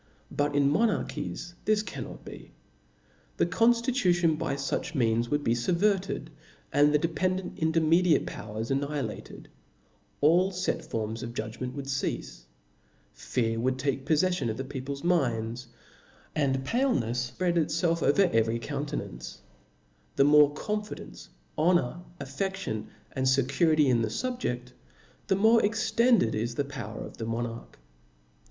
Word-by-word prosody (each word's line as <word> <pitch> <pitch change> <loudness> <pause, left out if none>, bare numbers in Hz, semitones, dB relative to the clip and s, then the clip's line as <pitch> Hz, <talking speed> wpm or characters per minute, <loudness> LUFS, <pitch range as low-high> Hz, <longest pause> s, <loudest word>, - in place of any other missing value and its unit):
But 145 0 0
in 140 -1 +4
monarchies 175 0 -1
this 215 -1 +2
cannot 200 - -8
be; - - -11 0.8
the - - +3
conftitution 225 - +3
by 140 -2 -2
fuch 140 +4 -3
means 115 -2 +1
would 145 0 0
be 115 - +2
fubverted, 185 - 0 0.4
and 145 +1 +5
the 150 - +4
dependent 180 +4 -1
intermediate 165 +1 +3
powers 110 +3 -5
annihilated; 140 -4 -3 0.7
all 175 +6 +4
fet 185 -1 -2
forms 110 0 -4
of 120 0 -6
judgment 115 +4 -4
would 140 -1 -5
ceafe; 135 - -3 0.7
fear 115 -2 -1
would 130 +2 0
take 135 0 -1
poffeffion 155 -2 +1
of 110 - -3
the 135 - -3
people's 140 +1 -6
minds, 120 -8 0 0.7
and 135 -3 0
palenefs 125 - 0
fpread 180 -2 +1
itfelf 165 +2 0
over 170 +8 +4
every 115 +1 +2
countenance: 140 - -5 0.8
the - - +5
more 145 0 +6
confidence, 210 - -5 0.3
honor, 170 -3 +2 0.2
affe<5lion, 140 - -3 0.2
and 130 0 -1
fecurity 140 +4 +3
in 120 -3 +3
the 110 - 0
fubjeft, 125 - -3 0.6
the 195 - +3
more 220 +4 +5
extended 225 - +3
is 115 +2 -2
the 140 - 0
power 135 -7 -6
of - - -11
the 115 - -4
monarch. 115 0 -4
145 Hz, 130 wpm, -28 LUFS, 120-180 Hz, 0.8 s, more